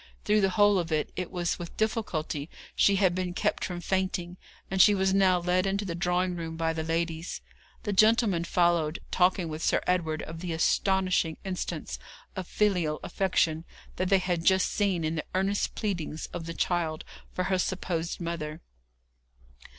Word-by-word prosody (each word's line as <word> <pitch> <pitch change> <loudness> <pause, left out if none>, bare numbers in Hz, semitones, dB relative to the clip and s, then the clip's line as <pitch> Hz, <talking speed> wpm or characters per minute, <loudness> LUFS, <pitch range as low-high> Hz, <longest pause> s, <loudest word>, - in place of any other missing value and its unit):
Through 210 0 +3
the 195 - +3
whole 205 0 +4
of 170 -1 -3
it, 155 -1 0
it 180 -1 -3
was 175 -2 -2
with 170 -1 -8
difficulty 170 - -2 0.3
she 200 - +4
had 190 -2 +3
been 180 -1 -3
kept - - 0
from 175 -1 -4
fainting, 185 -1 -1 0.3
and 190 -1 +4
she 205 - +7
was 190 0 +2
now 190 -2 +4
led 180 +2 +1
into 200 +1 -1
the 175 - -3
drawing 180 +1 0
room 165 -1 -5
by 165 0 0
the 160 - -3
ladies. 165 +1 -2 0.4
The 205 - -1
gentlemen 215 -4 +4
followed, 170 -3 +2
talking 180 -1 +2
with 155 0 -5
Sir - - +2
Edward 160 -4 0
of 160 +1 -7
the 175 -1 -3
astonishing 185 0 +1
instance 185 -2 -4 0.4
of 185 -3 -5
filial 180 -8 +1
affection 165 -4 +1 0.3
they 185 +1 +3
had 180 -3 -1
just 190 +1 +3
seen 195 -5 0
in 155 0 0
the 150 - -3
earnest 195 +2 0
pleadings 175 -7 -3
of 165 -1 -5
the 165 - -5
child 165 -3 -1 0.3
for 185 - -2
her 185 0 0
supposed 175 -2 -2
mother. 165 -2 -4
180 Hz, 170 wpm, -28 LUFS, 165-190 Hz, 0.4 s, she